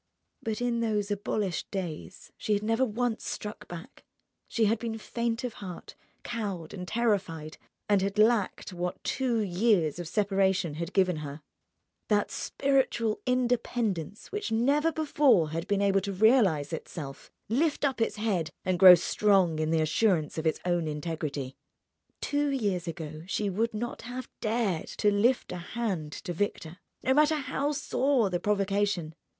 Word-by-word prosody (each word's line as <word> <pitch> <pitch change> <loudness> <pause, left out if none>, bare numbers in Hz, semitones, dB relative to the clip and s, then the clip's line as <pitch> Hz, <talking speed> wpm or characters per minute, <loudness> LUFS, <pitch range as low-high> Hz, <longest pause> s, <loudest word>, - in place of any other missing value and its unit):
But 220 0 -3
in 240 -1 0
those 210 -3 0
abolished 200 -3 -2
days 180 -6 -6
she 215 - -1
had 205 - -2
never 225 +4 +2
once 240 -1 -1
struck 210 0 -6
back, 175 0 -10 0.4
she 225 - +1
had 215 +2 +2
been 225 -1 -3
faint 235 +2 -2
of 245 -3 -3
heart, 180 -3 -8 0.3
cowed 200 -9 -4
and 180 -2 -6
terrified, 185 -10 -1 0.3
and 205 -2 +3
had 195 +1 -2
lacked 215 -3 +2
what 180 +1 -4
two 250 -4 0
years 185 -5 +2
of 175 - -5
separation 195 -3 +1
had 170 +3 -4
given 185 -4 +3
her, 150 0 -7 0.7
that 205 -1 +1
spiritual 265 -5 0
independence 235 -7 -1
which 415 - -3
never 280 +8 +3
before 285 - +3
had 165 +3 -3
been 200 0 +1
able 195 -1 +3
to 200 +1 -3
realize 190 - +3
itself, 145 -3 -7 0.2
lift 295 +6 +1
up 265 -4 0
its 225 - +1
head, 200 -7 -1 0.2
and 185 -2 0
grow 185 -1 +11
strong 185 -2 +2
in 155 0 0
the 160 -1 +2
assurance 155 0 +1
of 160 - -1
its 160 - 0
own 175 -2 +1
integrity. 150 -3 -4 0.7
Two 290 0 0
years 200 -10 -1
ago 155 -2 -6
she 200 +1 -1
would 225 +4 -1
not 240 +3 -4
have 250 +2 -6
dared 215 -6 0
to 210 - +1
lift 235 +5 +2
a 180 - -4
hand 180 -4 -3
to 175 +3 -5
Victor, 175 -2 -3 0.2
no 260 - +3
matter 300 +2 +4
how 285 0 -1
sore 270 -6 +1
the 175 - 0
provocation. 200 -4 0
205 Hz, 155 wpm, -29 LUFS, 175-235 Hz, 0.7 s, grow